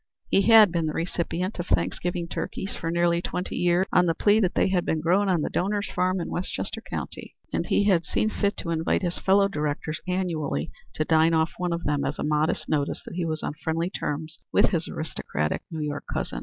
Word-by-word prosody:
He 195 Hz, -, +4 dB
had 220 Hz, -2 st, +7 dB
been 165 Hz, -2 st, 0 dB
the 155 Hz, -, -2 dB
recipient 175 Hz, +3 st, -2 dB
of 175 Hz, -, -3 dB
Thanksgiving 170 Hz, -, 0 dB
turkeys 190 Hz, +3 st, -4 dB
for 165 Hz, -, -3 dB
nearly 170 Hz, 0 st, +2 dB
twenty 180 Hz, +1 st, -4 dB
years 175 Hz, +1 st, +2 dB
on 180 Hz, -1 st, +5 dB
the 165 Hz, -, +1 dB
plea 210 Hz, +4 st, +4 dB
that 185 Hz, -5 st, +1 dB
they -, -, +3 dB
had 180 Hz, -2 st, +1 dB
been 160 Hz, -, 0 dB
grown 185 Hz, +5 st, +2 dB
on 175 Hz, -4 st, +2 dB
the -, -, -1 dB
donor's 200 Hz, +2 st, -1 dB
farm 185 Hz, +1 st, +1 dB
in 170 Hz, -, -3 dB
Westchester 205 Hz, +4 st, -3 dB
county, -, -, -6 dB, 0.2 s
and -, -, -1 dB
he -, -, +3 dB
had 185 Hz, -5 st, +3 dB
seen 215 Hz, +6 st, 0 dB
fit 200 Hz, -1 st, 0 dB
to 170 Hz, -, -3 dB
invite 165 Hz, +3 st, 0 dB
his 175 Hz, -1 st, -2 dB
fellow 195 Hz, +1 st, +4 dB
directors 150 Hz, -3 st, -3 dB
annually 175 Hz, -5 st, -1 dB, 0.2 s
to 155 Hz, -, 0 dB
dine 160 Hz, +1 st, +4 dB
off 160 Hz, +1 st, +2 dB
one 180 Hz, -1 st, -1 dB
of 170 Hz, 0 st, -2 dB
them 145 Hz, -1 st, 0 dB
as -, -, -2 dB
a -, -, -3 dB
modest 150 Hz, +1 st, 0 dB
notice 145 Hz, -2 st, -1 dB
that -, -, -8 dB
he 175 Hz, -1 st, -2 dB
was 155 Hz, -1 st, -3 dB
on -, -, -2 dB
friendly 165 Hz, +3 st, -1 dB
terms 155 Hz, -2 st, -4 dB
with -, -, +4 dB
his -, -, -1 dB
aristocratic 75 Hz, +2 st, -3 dB
New 160 Hz, -2 st, -5 dB
York 145 Hz, -1 st, -3 dB
cousin. -, -, -3 dB
170 Hz, 220 wpm, -26 LUFS, 160-185 Hz, 0.2 s, had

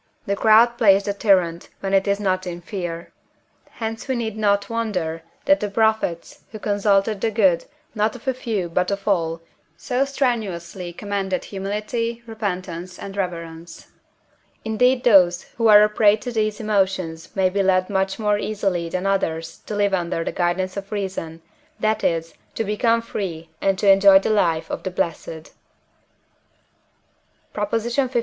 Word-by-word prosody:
The 200 Hz, -, 0 dB
crowd 230 Hz, +3 st, +5 dB
plays 200 Hz, -3 st, +5 dB
the 200 Hz, -, -2 dB
tyrant, 185 Hz, -5 st, +1 dB
when 195 Hz, 0 st, -2 dB
it 195 Hz, +1 st, +3 dB
is 200 Hz, 0 st, +1 dB
not 185 Hz, -2 st, -1 dB
in 175 Hz, -1 st, -5 dB
fear; 175 Hz, -3 st, -6 dB, 0.6 s
hence 225 Hz, +1 st, -5 dB
we 260 Hz, -, 0 dB
need 225 Hz, -3 st, -3 dB
not 200 Hz, -2 st, +1 dB
wonder 185 Hz, -8 st, -2 dB, 0.2 s
that 290 Hz, +1 st, +4 dB
the 210 Hz, -, -2 dB
prophets, 220 Hz, -5 st, 0 dB
who 215 Hz, -, -7 dB
consulted 205 Hz, 0 st, +1 dB
the 225 Hz, -, +1 dB
good, 195 Hz, -6 st, +2 dB, 0.3 s
not 215 Hz, +1 st, 0 dB
of 250 Hz, +2 st, -13 dB
a 265 Hz, -, +2 dB
few, 225 Hz, -8 st, -3 dB
but 180 Hz, +2 st, 0 dB
of 200 Hz, +1 st, -4 dB
all, 165 Hz, -4 st, 0 dB, 0.4 s
so 255 Hz, +1 st, 0 dB
strenuously 205 Hz, -10 st, -2 dB
commended 195 Hz, 0 st, -3 dB
Humility, 215 Hz, +4 st, -3 dB
Repentance, 185 Hz, -5 st, -5 dB
and 195 Hz, 0 st, -8 dB
Reverence. 170 Hz, -3 st, -6 dB, 0.8 s
Indeed 250 Hz, +3 st, +2 dB
those 185 Hz, -6 st, +5 dB
who 230 Hz, -1 st, +2 dB
are 210 Hz, -1 st, +8 dB
a -, -, +5 dB
prey 210 Hz, -1 st, +4 dB
to 245 Hz, +3 st, -6 dB
these 215 Hz, -2 st, -1 dB
emotions 190 Hz, -6 st, -1 dB
may 190 Hz, -1 st, +2 dB
be 200 Hz, +1 st, +1 dB
led 185 Hz, -1 st, +2 dB
much 190 Hz, -1 st, -1 dB
more 210 Hz, -2 st, +1 dB
easily 195 Hz, -6 st, -2 dB
than 185 Hz, +2 st, -3 dB
others 165 Hz, -5 st, -1 dB
to 210 Hz, -, -4 dB
live 205 Hz, -1 st, +1 dB
under 170 Hz, -2 st, -1 dB
the -, -, -3 dB
guidance 185 Hz, +1 st, -1 dB
of 200 Hz, 0 st, -6 dB
reason, 185 Hz, -5 st, -4 dB, 0.4 s
that 215 Hz, 0 st, 0 dB
is, 165 Hz, -1 st, 0 dB, 0.2 s
to -, -, -1 dB
become 230 Hz, +2 st, +1 dB
free 170 Hz, -7 st, -5 dB
and 195 Hz, -1 st, +1 dB
to 200 Hz, -, 0 dB
enjoy 195 Hz, 0 st, +7 dB
the 195 Hz, -, +1 dB
life 170 Hz, -6 st, +1 dB
of -, -, -3 dB
the -, -, -3 dB
blessed. 165 Hz, -2 st, -4 dB, 2.0 s
PROP. 205 Hz, -1 st, -2 dB
LV. 240 Hz, +3 st, 0 dB
200 Hz, 160 wpm, -22 LUFS, 180-220 Hz, 2.0 s, are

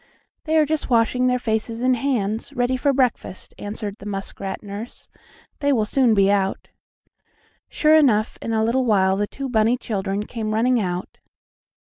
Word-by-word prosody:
"They 320 Hz, 0 st, +1 dB
are 310 Hz, -, +5 dB
just 310 Hz, 0 st, -2 dB
washing 245 Hz, +1 st, +2 dB
their 250 Hz, 0 st, +2 dB
faces 225 Hz, 0 st, -2 dB
and 255 Hz, 0 st, +3 dB
hands, 230 Hz, -3 st, -2 dB
ready 245 Hz, 0 st, 0 dB
for 280 Hz, +3 st, +1 dB
breakfast," 255 Hz, -8 st, -1 dB
answered 205 Hz, 0 st, -5 dB
the 205 Hz, -, -9 dB
muskrat 195 Hz, 0 st, -5 dB
nurse. 205 Hz, +3 st, -8 dB, 0.5 s
"They 285 Hz, 0 st, +1 dB
will 225 Hz, -6 st, +2 dB
soon 240 Hz, 0 st, +2 dB
be 195 Hz, 0 st, +4 dB
out." 195 Hz, -1 st, -1 dB, 1.0 s
Sure 305 Hz, 0 st, +3 dB
enough, 240 Hz, -9 st, +3 dB
in 230 Hz, -, -4 dB
a 220 Hz, -1 st, +1 dB
little 245 Hz, +4 st, +1 dB
while 190 Hz, -4 st, +3 dB
the 205 Hz, +1 st, -1 dB
two 275 Hz, +4 st, -6 dB
bunny 230 Hz, 0 st, +2 dB
children 200 Hz, -4 st, -3 dB
came 215 Hz, -2 st, -3 dB
running 245 Hz, +2 st, +2 dB
out. 180 Hz, -2 st, -4 dB
225 Hz, 165 wpm, -22 LUFS, 205-255 Hz, 1.0 s, are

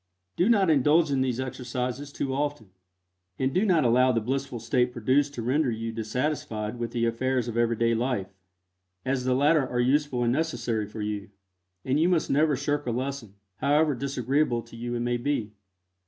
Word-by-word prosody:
Do 180 Hz, +6 st, +2 dB
not 200 Hz, -7 st, +4 dB
indulge 150 Hz, +2 st, +4 dB
in 135 Hz, -1 st, +1 dB
these 130 Hz, -2 st, 0 dB
exercises 130 Hz, +1 st, -4 dB
too 135 Hz, -1 st, -3 dB
often, 145 Hz, -7 st, -3 dB, 0.7 s
and 130 Hz, 0 st, 0 dB
do 185 Hz, -, +2 dB
not 175 Hz, -9 st, +3 dB
allow 125 Hz, +2 st, +4 dB
the 115 Hz, -, +1 dB
blissful 130 Hz, +2 st, -3 dB
state 125 Hz, +2 st, +1 dB
produced 135 Hz, +5 st, +1 dB
to 115 Hz, -, -4 dB
render 135 Hz, +4 st, +1 dB
you 115 Hz, 0 st, -3 dB
dissatisfied 115 Hz, 0 st, -3 dB
with 120 Hz, -1 st, -2 dB
the 115 Hz, 0 st, -1 dB
affairs 125 Hz, +1 st, 0 dB
of 115 Hz, -, -4 dB
everyday 115 Hz, 0 st, +2 dB
life, 115 Hz, -5 st, -1 dB, 0.7 s
as 130 Hz, -1 st, -1 dB
the 130 Hz, 0 st, +2 dB
latter 145 Hz, +1 st, +3 dB
are 125 Hz, -, -2 dB
useful 130 Hz, 0 st, +1 dB
and 120 Hz, 0 st, +2 dB
necessary 120 Hz, -8 st, -1 dB
for 105 Hz, +1 st, -6 dB
you, 105 Hz, -2 st, -4 dB, 0.6 s
and 130 Hz, +3 st, +1 dB
you 170 Hz, +3 st, +3 dB
must 175 Hz, -3 st, +1 dB
never 150 Hz, +1 st, +3 dB
shirk 145 Hz, +1 st, -2 dB
a -, -, +1 dB
lesson, 125 Hz, -4 st, -4 dB, 0.2 s
however 145 Hz, +4 st, +3 dB
disagreeable 135 Hz, -1 st, 0 dB
to -, -, -14 dB
you 120 Hz, +1 st, -4 dB
it 120 Hz, -, -2 dB
may 120 Hz, 0 st, 0 dB
be. 120 Hz, -5 st, -2 dB
130 Hz, 185 wpm, -27 LUFS, 115-145 Hz, 0.7 s, not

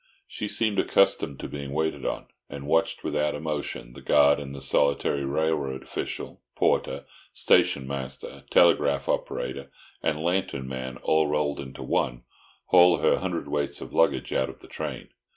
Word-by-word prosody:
She 105 Hz, -, -4 dB
seemed 105 Hz, -1 st, 0 dB
accustomed 70 Hz, -7 st, +2 dB
to -, -, -4 dB
being 70 Hz, -1 st, -6 dB
waited 75 Hz, -3 st, -1 dB
on, -, -, -3 dB, 0.2 s
and 70 Hz, 0 st, -7 dB
watched 80 Hz, +3 st, +1 dB
without 75 Hz, 0 st, 0 dB
emotion 75 Hz, -5 st, -4 dB
the -, -, -11 dB
guard 70 Hz, 0 st, +5 dB
and 70 Hz, -1 st, -7 dB
the -, -, -7 dB
solitary 70 Hz, +1 st, +1 dB
railway 70 Hz, -1 st, 0 dB
official—porter, 65 Hz, -, -2 dB, 0.3 s
station 70 Hz, -, +3 dB
master, 65 Hz, -1 st, -6 dB
telegraph 70 Hz, -5 st, +4 dB
operator 70 Hz, 0 st, -2 dB, 0.3 s
and 75 Hz, -, 0 dB
lantern 85 Hz, -7 st, -1 dB
man, 65 Hz, -1 st, -5 dB
all 80 Hz, -1 st, +3 dB
rolled 75 Hz, -1 st, 0 dB
into 65 Hz, -1 st, -7 dB
one—haul 85 Hz, +8 st, +2 dB
her -, -, +3 dB
hundredweights 75 Hz, -1 st, -2 dB
of -, -, -9 dB
luggage 70 Hz, -6 st, +2 dB
out 65 Hz, -, +1 dB
of -, -, -12 dB
the -, -, -13 dB
train. -, -, -6 dB
70 Hz, 145 wpm, -26 LUFS, 70-80 Hz, 0.3 s, guard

